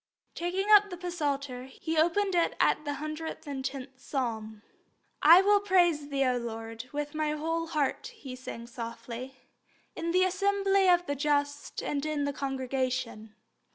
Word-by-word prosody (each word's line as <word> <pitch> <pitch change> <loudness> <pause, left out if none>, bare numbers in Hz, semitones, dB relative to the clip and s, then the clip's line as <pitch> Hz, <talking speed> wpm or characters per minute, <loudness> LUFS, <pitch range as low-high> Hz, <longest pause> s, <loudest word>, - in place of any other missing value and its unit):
Taking 355 +3 -2
up 415 -1 +8
the 355 -1 -5
Psalter, 280 -6 -2
he 320 +5 -5
opened 345 +5 +2
it 345 -1 +2
at 305 - +2
the 290 - -1
110th 280 -3 -5
Psalm. 220 -6 -4 0.6
"I 340 +5 +8
will 410 +1 +5
praise 350 -7 +2
Thee, 275 -1 +1
O 250 -1 +2
Lord, 225 +1 -6
with 295 +1 -3
my 305 -1 0
whole 330 +2 -2
heart," 300 -4 -1
he 295 - -9
sang 240 -2 -8
softly, 235 +2 -7 0.6
"in 335 - -3
the 365 +2 +4
assembly 390 0 +2
of 355 0 +4
the 285 - -1
just 285 0 -1
and 285 -1 -2
in 305 -1 -1
the 285 0 -1
congregation." 260 -5 -3
290 Hz, 150 wpm, -29 LUFS, 260-345 Hz, 0.6 s, up